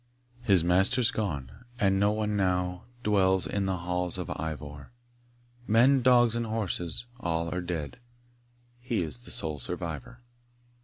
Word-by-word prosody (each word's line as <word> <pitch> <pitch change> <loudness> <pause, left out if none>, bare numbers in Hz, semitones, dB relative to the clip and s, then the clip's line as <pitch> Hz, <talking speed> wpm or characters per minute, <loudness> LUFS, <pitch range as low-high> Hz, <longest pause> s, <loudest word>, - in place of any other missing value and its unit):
His 100 -8 +4
master's 95 +8 +4
gone, 75 -12 -3 0.3
and 95 -1 +3
no 100 +1 +3
one 105 0 -1
now 90 -1 0 0.2
Dwells 95 -3 +3
in 100 -1 -1
the 95 -1 0
halls 90 0 -2
of - - -5
Ivor; 75 - -6 0.8
Men, 125 +5 +5
dogs, 120 -2 +5
and 115 -1 -2
horses, 105 -3 -2
all 85 -5 -2
are 90 - -2
dead, 85 - -5 0.8
He 120 -6 -1
is 70 -7 -7
the - - -14
sole 75 -2 0
survivor. 120 - -6
95 Hz, 140 wpm, -28 LUFS, 85-110 Hz, 0.8 s, Men